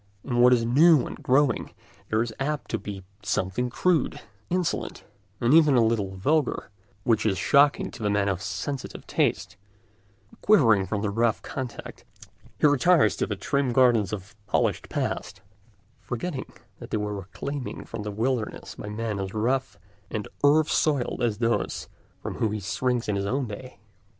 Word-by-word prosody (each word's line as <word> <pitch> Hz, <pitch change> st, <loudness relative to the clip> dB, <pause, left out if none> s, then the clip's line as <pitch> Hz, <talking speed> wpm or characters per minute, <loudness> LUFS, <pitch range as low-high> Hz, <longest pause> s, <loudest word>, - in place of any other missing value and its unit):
In 120 Hz, -3 st, -1 dB
what 125 Hz, +1 st, +7 dB
is 120 Hz, -2 st, +3 dB
new 150 Hz, +4 st, +5 dB
and -, -, -8 dB
growing 130 Hz, -2 st, +1 dB, 0.3 s
there 110 Hz, +1 st, +2 dB
is 115 Hz, -2 st, -6 dB
apt 145 Hz, +2 st, -2 dB
to 115 Hz, -, -1 dB
be 100 Hz, -2 st, -7 dB, 0.2 s
something 100 Hz, +4 st, -1 dB
crude, 165 Hz, +3 st, +1 dB, 0.3 s
insolent, 180 Hz, -1 st, -2 dB, 0.4 s
even 150 Hz, +3 st, +5 dB
a 120 Hz, -2 st, +5 dB
little 105 Hz, -4 st, 0 dB
vulgar, 140 Hz, +7 st, 0 dB, 0.3 s
which 110 Hz, -1 st, +2 dB
is 100 Hz, -3 st, +1 dB
shocking 145 Hz, +5 st, +3 dB
to -, -, -11 dB
the 105 Hz, -, 0 dB
man 100 Hz, -1 st, +1 dB
of 95 Hz, -2 st, -1 dB
sensitive 140 Hz, +5 st, -5 dB
taste; -, -, 0 dB, 0.8 s
quivering 115 Hz, -, +4 dB
from 105 Hz, +2 st, -2 dB
the 105 Hz, -, 0 dB
rough 115 Hz, +1 st, +1 dB
contact, 130 Hz, -3 st, -7 dB, 0.6 s
he -, -, +3 dB
retires 150 Hz, +4 st, +4 dB
to -, -, 0 dB
the 105 Hz, -, -2 dB
trim 135 Hz, +6 st, 0 dB
gardens 120 Hz, -6 st, +4 dB
of 100 Hz, 0 st, -6 dB
a 105 Hz, -1 st, -34 dB
polished -, -, 0 dB
past, -, -, -3 dB, 0.6 s
forgetting 130 Hz, +3 st, -5 dB, 0.3 s
that -, -, -9 dB
they -, -, -1 dB
were 105 Hz, 0 st, -2 dB
reclaimed 125 Hz, +8 st, -6 dB
from -, -, -6 dB
the 105 Hz, -, -4 dB
wilderness 115 Hz, +2 st, -2 dB
by 105 Hz, -, -8 dB
men 105 Hz, -1 st, -3 dB
as 95 Hz, +1 st, -5 dB
rough 130 Hz, +5 st, 0 dB, 0.3 s
and 105 Hz, -2 st, -4 dB, 0.2 s
earth 150 Hz, +2 st, +5 dB
soiled 140 Hz, -5 st, +1 dB
as 115 Hz, -4 st, +1 dB
those 115 Hz, -2 st, -1 dB, 0.3 s
from -, -, -5 dB
whom 110 Hz, -2 st, +1 dB
he 110 Hz, -, -2 dB
shrinks 115 Hz, +5 st, -1 dB
in 105 Hz, -, 0 dB
his 100 Hz, 0 st, -1 dB
own 135 Hz, +5 st, 0 dB
day. 125 Hz, +5 st, -9 dB
115 Hz, 165 wpm, -26 LUFS, 105-135 Hz, 0.8 s, what